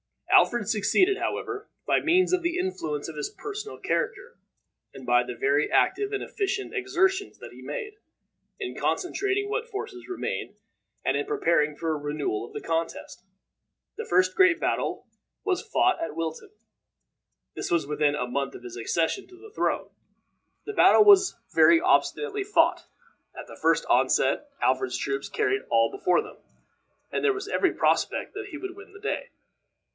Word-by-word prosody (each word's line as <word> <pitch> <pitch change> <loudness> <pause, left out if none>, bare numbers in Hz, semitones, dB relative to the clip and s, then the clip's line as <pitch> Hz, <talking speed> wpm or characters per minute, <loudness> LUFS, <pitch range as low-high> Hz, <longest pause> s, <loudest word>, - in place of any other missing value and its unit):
Alfred 240 -5 +4
succeeded, 365 - +2
however, 415 0 -3 0.2
by - - +3
means 365 +2 +3
of 365 - +3
the 345 +1 -1
influence 160 - -3
of 160 - -8
his 150 - -3
personal 420 +1 -7
character, 480 +1 -3 0.6
and 130 - -10
by 120 0 +4
the 125 0 -6
very 140 +5 +1
active 405 +1 +2
and 405 - -2
efficient 395 -1 -3
exertions 380 0 0
that - - -11
he - - -13
made, 425 -4 -6 0.6
in 380 - -4
concentrating 395 +2 -1
what 455 +3 -2
forces 390 -4 -7
remained, 370 - -4 0.5
and - - +2
in 420 - -1
preparing 170 - +1
for 165 +1 -2
a - - 0
renewal 145 -7 -3
of - - -16
the - - -5
contest. 165 +2 -3 0.7
The 450 - -4
first 185 +1 +3
great 375 -3 +4
battle - - -1
that - - -42 0.3
was 380 -3 0
fought 370 -5 +1
was 330 - -2
at - - -10
Wilton. 165 - -4 1.0
This - - -5
was 170 -3 +1
within 150 0 +1
a 125 - -2
month 135 +2 -3
of - - -11
his 120 -1 -8
accession 165 - -1
to 370 - -16
the 430 +3 -14
throne. - - -1 0.8
The 425 - -5
battle 425 - +6
was 400 -2 +6 0.2
very 335 - +6
obstinately 410 +4 +1
fought; 415 +2 +2 0.5
at - - -7
the - - -13
first - - +3
onset 295 - +2
Alfred's 130 -1 +1
troops 140 0 -3
carried 415 -1 0
all - - +3
before 395 -2 +1
them, - - -12 0.7
and - - -2
there 425 -1 +4
was 400 0 -6
every - - +1
prospect - - +1
that 410 0 -6
he 315 - -7
would 375 +2 -7
win 400 0 -14
the 395 - -12
day. 485 +4 -3
370 Hz, 170 wpm, -26 LUFS, -, 1.0 s, battle